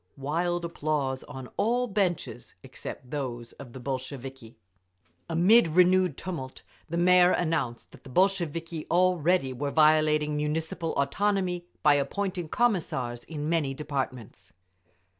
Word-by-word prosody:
Wild 170 +5 -1
applause 145 -5 -2
on 130 -3 -8
all 245 +3 +2
benches 195 -6 -2
except 125 - -9
those 120 -5 -4
of 130 -4 -11
the 130 - -8
Bolsheviki. 130 -2 -6 0.7
Amid 180 +7 +5
renewed 180 -1 +3
tumult 155 -8 -6 0.3
the 170 - -2
Mayor 180 0 +6
announced 160 -10 -1
that - - -16
the - - -12
Bolsheviki 170 -1 0
already 175 -5 +2
were 140 +3 -3
violating 155 0 +3
Municipal 160 +2 -2
autonomy 180 +4 0 0.2
by 150 -1 +6
appointing 175 +4 -2
Commissars 140 - 0
in 150 -2 -5
many 155 -5 0
departments. 130 -9 -5
155 Hz, 120 wpm, -27 LUFS, 135-180 Hz, 0.7 s, Mayor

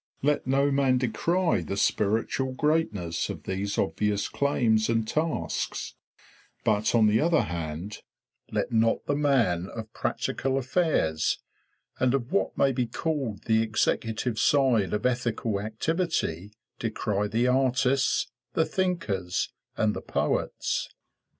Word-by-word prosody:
Let 145 -2 +1
no 140 +2 +3
man 135 -2 +3
decry 165 - +1
the 100 +4 -4
spiritual 110 +6 +1
greatness 130 - 0
of - - -6
these 100 +2 -3
obvious 105 +1 0
claims 115 -6 +2
and 115 -1 +1
tasks; 155 +5 -2 0.7
but 110 +1 +2
on 115 -2 +5
the 105 +1 +4
other 165 0 +3
hand, 85 +4 -5 0.5
let - - -1
not 115 0 +2
the 145 - 0
man 125 -12 +2
of 110 -1 -8
practical 135 0 -1
affairs 130 - +1 0.6
and 130 0 +3
of 125 -2 -3
what 200 - 0
may 135 - +4
be 125 -2 -1
called 130 - -3
the 110 0 +3
executive 110 +1 0
side 130 -9 +3
of 105 +2 -1
ethical 120 -4 0
activity 110 - -2 0.3
decry 105 -2 -1
the 115 +3 +1
artists, 130 +1 +2 0.2
the 160 - +2
thinkers, 105 - -1 0.3
and 110 -1 +2
the - - -4
poets. - - -1
115 Hz, 125 wpm, -27 LUFS, 105-140 Hz, 0.7 s, on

